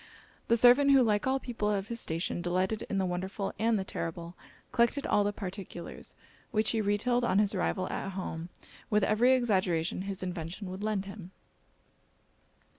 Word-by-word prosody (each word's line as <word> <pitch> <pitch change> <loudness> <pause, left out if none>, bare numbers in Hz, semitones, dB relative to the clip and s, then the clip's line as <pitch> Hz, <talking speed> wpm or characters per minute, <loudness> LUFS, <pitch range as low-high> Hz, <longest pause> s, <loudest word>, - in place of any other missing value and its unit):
The 230 - +4
servant, 250 +4 +6
who 270 -2 +7
like 210 0 +1
all 265 +1 +2
people 230 -5 -2
of 200 -1 -1
his 235 0 -2
station 165 0 -2
delighted 185 +4 -1
in 200 - -1
the 190 - +1
wonderful 190 +2 -3
and 225 0 +2
the 195 - -1
terrible, 170 -2 -5 0.4
collected 235 +4 +2
all 205 - +3
the 205 - 0
particulars; 190 -3 -7 0.3
which 220 -2 +1
he 225 - +1
retailed 225 +4 +1
on 230 - +2
his 205 0 +3
arrival 185 0 -1
at 195 - -4
home, 170 -3 -5 0.4
with 210 -1 +3
every 230 +6 +4
exaggeration 185 -9 +1
his 195 -1 -5
invention 180 +2 -5
would 190 +2 -7
lend 210 -2 -1
him. 195 -2 -9
200 Hz, 170 wpm, -30 LUFS, 185-225 Hz, 0.4 s, who